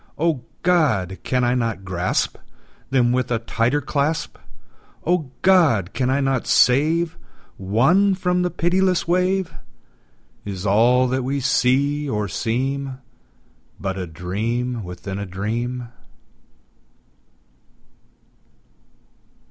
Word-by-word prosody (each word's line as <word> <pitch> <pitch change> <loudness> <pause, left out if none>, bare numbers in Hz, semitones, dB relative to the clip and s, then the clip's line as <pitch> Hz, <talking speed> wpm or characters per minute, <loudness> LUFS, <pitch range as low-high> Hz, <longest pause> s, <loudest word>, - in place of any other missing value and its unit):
O 160 -5 0 0.2
God! 120 - +2
can 125 -1 0
I 120 0 +2
not 115 -6 -2
grasp 90 -1 -1 0.5
Them 125 -3 +3
with 130 0 0
a 120 - +1
tighter 115 +5 0
clasp? 150 +3 -2 0.7
O 165 -5 +1
God! 150 - +4
can 130 -1 0
I 135 +2 +2
not 135 -2 0
save 160 +6 +3 0.4
One 135 - +3
from 180 -1 0
the 180 - +1
pitiless 180 +1 +1
wave? 185 +1 +1 0.9
Is 95 -1 -6
all 120 +6 +4
that 130 +1 0
we 140 +2 -1
see 140 +3 +1
or 105 -3 -1
seem 130 +6 -2 0.8
But 95 +1 -3
a 90 - -4
dream 110 +8 -3
within 90 +2 -6
a 100 - -4
dream? 115 +6 -3
125 Hz, 110 wpm, -21 LUFS, 110-155 Hz, 0.9 s, God